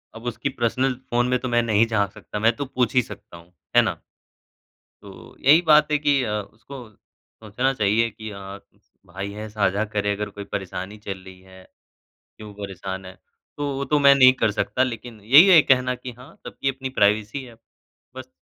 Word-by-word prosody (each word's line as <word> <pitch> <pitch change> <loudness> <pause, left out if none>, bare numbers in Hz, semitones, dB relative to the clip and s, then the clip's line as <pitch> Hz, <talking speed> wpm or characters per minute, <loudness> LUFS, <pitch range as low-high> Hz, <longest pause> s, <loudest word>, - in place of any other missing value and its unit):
अब 115 - -11
उसकी 120 +3 -3
personal 130 +1 -1 0.2
phone 120 +1 +1
में 125 0 +1
तो 130 - -5
मैं 120 0 +2
नहीं 110 -1 +3
झाँक 100 -4 0
सकता, 105 - -8
मैं 115 +2 +2
तो 140 - -4
पूछ 125 -3 -1
ही 125 - +5
सकता 85 - -12
हूँ, 85 +1 -19 0.2
है - - +8
ना? - - -3 1.0
तो, - - -14
यही 155 +6 +5
बात 150 -1 +5
है - - +4
कि 145 -2 +2
अ, 110 - -3
उसको 110 +7 -14
सोचना 110 +4 -5
चाहिए 110 +1 +1
कि 110 0 -9
अ, 100 0 -9 0.5
भाई 95 +3 -6
है, 105 +1 -7
साझा 105 -1 0
करे, 105 0 0
अगर 105 +1 -4
कोई 100 - -6
परेशानी 95 +1 -5
चल 95 -1 -4
रही 95 -1 -13
है, 95 0 -16 0.8
क्यों 105 -1 -11
परेशान 95 -1 -7
है, 95 - -10 0.4
तो 145 -1 -2
वो 140 +1 -3
तो 150 +1 +1
मैं 140 -1 +7
नहीं 130 -1 +7
कर 110 - +3
सकता 120 +4 0
लेकिन 120 -3 -6
यही 140 - +7
है 170 -4 +8
कहना 125 -1 +2
कि 125 0 -9
हाँ, 125 +2 -15
सबकी 135 - -3
अपनी 135 0 -5
प्राइवेसी 105 +6 +1
है। 120 -2 -13 0.6
बस 130 0 -9
115 Hz, 195 wpm, -23 LUFS, 100-130 Hz, 1.0 s, है